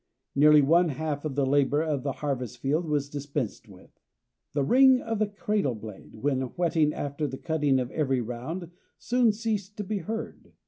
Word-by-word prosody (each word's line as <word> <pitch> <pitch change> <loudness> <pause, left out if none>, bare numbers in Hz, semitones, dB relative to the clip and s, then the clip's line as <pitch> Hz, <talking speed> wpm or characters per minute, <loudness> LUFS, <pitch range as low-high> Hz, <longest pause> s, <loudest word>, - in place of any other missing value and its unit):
Nearly 150 +1 +6
one 170 +4 +4
half 150 +1 -3
of 145 -4 -3
the 140 -1 +2
labor 145 +2 +2
of 150 -4 -1
the 140 - -2
harvest 125 -4 -3
field 145 +7 0
was 145 -2 0
dispensed 140 -5 -4
with; 95 -2 -17 0.5
the 140 -1 +1
ring 260 - +6
of 225 -3 -3
the 215 - +2
cradle 205 - -1
blade, 105 -2 -10
when 130 +3 0 0.2
whetting 160 -3 +2
after 145 +1 -3
the 135 -1 -6
cutting 150 -4 +1
of 125 -1 -3
every 135 -4 0
round, 130 +10 -5 0.3
soon 245 -2 +2
ceased 210 -2 -3
to 210 - -3
be 205 +1 -2
heard. 220 +6 -6
150 Hz, 180 wpm, -27 LUFS, 135-185 Hz, 0.5 s, Nearly